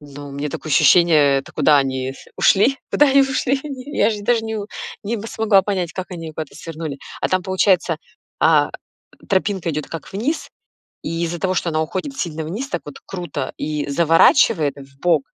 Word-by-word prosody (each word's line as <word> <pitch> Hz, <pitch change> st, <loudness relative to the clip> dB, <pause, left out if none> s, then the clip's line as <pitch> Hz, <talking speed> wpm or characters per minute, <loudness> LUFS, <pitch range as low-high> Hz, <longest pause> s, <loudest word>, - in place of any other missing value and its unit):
Ну, 145 Hz, 0 st, -10 dB
у -, -, -10 dB
меня 140 Hz, +2 st, -3 dB
такое 155 Hz, +2 st, -6 dB
ощущение, 150 Hz, -2 st, +5 dB
это 135 Hz, -, -9 dB
куда 150 Hz, -1 st, +4 dB
они 130 Hz, -1 st, -1 dB
с -, -, -15 dB
ушли? 245 Hz, +8 st, +4 dB
Куда 295 Hz, -, +5 dB
они 275 Hz, 0 st, +5 dB
ушли 270 Hz, 0 st, 0 dB
они? 280 Hz, 0 st, -7 dB
Я 210 Hz, -, +4 dB
же 210 Hz, -2 st, -4 dB
даже 230 Hz, +2 st, +2 dB
не 220 Hz, 0 st, -3 dB
у 205 Hz, -1 st, -4 dB, 0.4 s
не 215 Hz, +3 st, -2 dB
м, 205 Hz, -, -7 dB
смогла 210 Hz, -4 st, +3 dB
понять, 185 Hz, -4 st, -2 dB
как 185 Hz, 0 st, -6 dB
они 165 Hz, -3 st, -6 dB
куда-то 155 Hz, -2 st, -7 dB
свернули. 160 Hz, -3 st, -6 dB, 0.2 s
А -, -, 0 dB
там, 185 Hz, 0 st, +1 dB
получается, 190 Hz, -3 st, +2 dB, 0.4 s
а, -, -, +4 dB, 0.6 s
тропинка 190 Hz, -3 st, 0 dB
идёт 150 Hz, -1 st, -3 dB
как 165 Hz, -3 st, -8 dB
вниз, 245 Hz, +12 st, -2 dB, 0.6 s
и 165 Hz, +1 st, -2 dB
из-за 170 Hz, +1 st, -4 dB
того, 185 Hz, +2 st, 0 dB
что 170 Hz, -, 0 dB
она 155 Hz, -1 st, 0 dB
уходит 185 Hz, -, -4 dB
сильно 160 Hz, -6 st, -3 dB
вниз 220 Hz, -, -5 dB
так 175 Hz, -, -3 dB
вот 145 Hz, -, -9 dB
круто 175 Hz, -7 st, -5 dB
и 150 Hz, -1 st, -3 dB
заворачивает 165 Hz, -, +4 dB
вбок, 140 Hz, +3 st, 0 dB
170 Hz, 190 wpm, -20 LUFS, 150-205 Hz, 0.6 s, ощущение